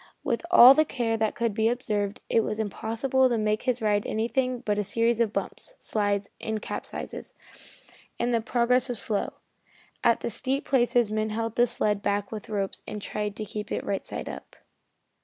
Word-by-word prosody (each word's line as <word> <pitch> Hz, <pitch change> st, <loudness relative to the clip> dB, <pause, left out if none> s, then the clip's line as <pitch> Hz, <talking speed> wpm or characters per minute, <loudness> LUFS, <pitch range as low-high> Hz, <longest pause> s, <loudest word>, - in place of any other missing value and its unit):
With 240 Hz, +3 st, -1 dB
all 265 Hz, -7 st, +10 dB
the 310 Hz, -, +4 dB
care 240 Hz, -6 st, -1 dB
that 220 Hz, -1 st, 0 dB
could 230 Hz, -2 st, 0 dB
be 220 Hz, +1 st, +2 dB
observed, 215 Hz, -3 st, -2 dB
it 225 Hz, -, +3 dB
was 215 Hz, 0 st, -3 dB
impossible 230 Hz, +5 st, +1 dB
to 240 Hz, -, +1 dB
make 215 Hz, 0 st, 0 dB
his 250 Hz, -3 st, -1 dB
ride 205 Hz, -1 st, +1 dB
anything 250 Hz, +3 st, -1 dB
but 210 Hz, -4 st, -1 dB
a -, -, +1 dB
series 230 Hz, +3 st, +1 dB
of 230 Hz, -3 st, +2 dB
bumps, -, -, -5 dB
slides 205 Hz, -2 st, -1 dB
and 220 Hz, -1 st, -2 dB
capsizes, -, -, -6 dB, 0.8 s
and 240 Hz, +1 st, 0 dB
the 230 Hz, -, +2 dB
progress 250 Hz, +2 st, +2 dB
was 245 Hz, -, 0 dB
slow. 205 Hz, -1 st, -1 dB, 0.7 s
At -, -, +3 dB
the -, -, -3 dB
steep 270 Hz, +1 st, -2 dB
places 240 Hz, -4 st, +2 dB
men 215 Hz, 0 st, 0 dB
held 225 Hz, +1 st, -3 dB
the 240 Hz, 0 st, +4 dB
sled 210 Hz, -2 st, +1 dB
back 200 Hz, 0 st, -1 dB
with 220 Hz, -1 st, -7 dB
ropes 200 Hz, -2 st, -3 dB
and 210 Hz, -, -5 dB
tried 210 Hz, 0 st, -4 dB
to 215 Hz, -, -5 dB
keep 210 Hz, 0 st, -6 dB
it -, -, -2 dB
right 195 Hz, -, -2 dB
side -, -, -5 dB
up. -, -, -9 dB
225 Hz, 190 wpm, -27 LUFS, 210-245 Hz, 0.8 s, all